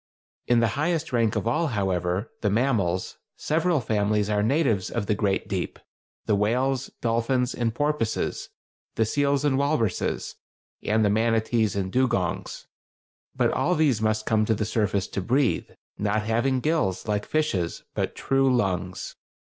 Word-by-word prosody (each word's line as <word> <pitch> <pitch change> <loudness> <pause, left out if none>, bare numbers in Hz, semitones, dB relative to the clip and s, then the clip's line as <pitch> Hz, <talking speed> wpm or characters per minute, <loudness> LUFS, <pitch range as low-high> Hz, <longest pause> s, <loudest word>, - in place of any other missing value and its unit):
In 120 -1 +4
the 115 - +3
highest 160 -2 -1
rank 115 -3 +2
of - - -1
all, 160 +8 +1
however, 95 - -1
the 105 - +1
mammals, 100 -6 0 0.2
several 165 +1 +1
families 105 -2 0
are 105 0 +2
natives 115 - +1
of 115 -3 -2
the 105 - +1
"great 100 -2 0
deep"—the 95 +2 -4
whales, 125 +6 0
dolphins, 120 +2 +1
and 115 -2 -1
porpoises, 145 -6 -1 0.5
the 110 - +2
seals 140 +4 +1
and 135 -2 +2
walruses, 140 -8 -1 0.4
and 110 0 +2
the 100 - +3
manatees 110 -1 +1
and 95 -2 -2
dugongs. 120 -8 -1 0.7
But - - +2
all 180 - +1
these 145 -9 +2
must 110 0 0
come 110 -2 +2
to 110 - +1
the 105 - -1
surface 105 -3 0
to 95 - -3
breathe, 125 +6 +1 0.3
not 105 +1 0
having 120 +4 +1
gills 150 - 0
like 105 -1 0
fishes, 105 - -1
but - - -2
true 135 0 +2
lungs. 95 -6 -1
115 Hz, 150 wpm, -25 LUFS, 105-135 Hz, 0.7 s, In